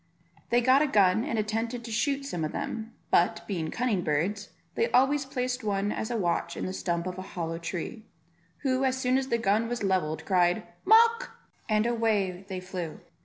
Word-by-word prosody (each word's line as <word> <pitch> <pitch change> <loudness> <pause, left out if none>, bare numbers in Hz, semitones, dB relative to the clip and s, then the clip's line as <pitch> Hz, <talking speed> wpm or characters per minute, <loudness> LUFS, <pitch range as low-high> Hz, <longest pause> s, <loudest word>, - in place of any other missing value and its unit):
They 240 +1 +4
got 260 +3 +5
a 305 - +3
gun 205 -4 +4
and 230 - -2
attempted 225 +3 -2
to 230 - -7
shoot 275 +5 0
some 175 - -3
of 155 - -2
them; 225 0 -4 0.2
but, 175 - +3
being 170 -6 -2
cunning 220 -5 0
birds, 185 +8 -1 0.2
they 460 - +1
always 270 +2 +3
placed 250 -1 -2
one 205 -1 0
as 220 - -3
a 240 - -1
watch 175 -5 -1
in - - -3
the 185 - -3
stump 170 -2 -2
of 185 0 -4
a 190 - -9
hollow 165 -1 -2
tree; 185 +6 -5 0.6
who, 260 -1 +1
as 260 -1 +1
soon 255 0 +1
as 265 - -4
the 235 - +1
gun 220 +1 +1
was 240 -2 -3
levelled 185 -5 0
cried 180 -2 +2 0.2
"Mawk," 460 +3 +5 0.3
and 215 0 +2
away 215 -6 0
they 190 -2 -4
flew. 185 -3 -6
215 Hz, 195 wpm, -28 LUFS, 185-250 Hz, 0.6 s, got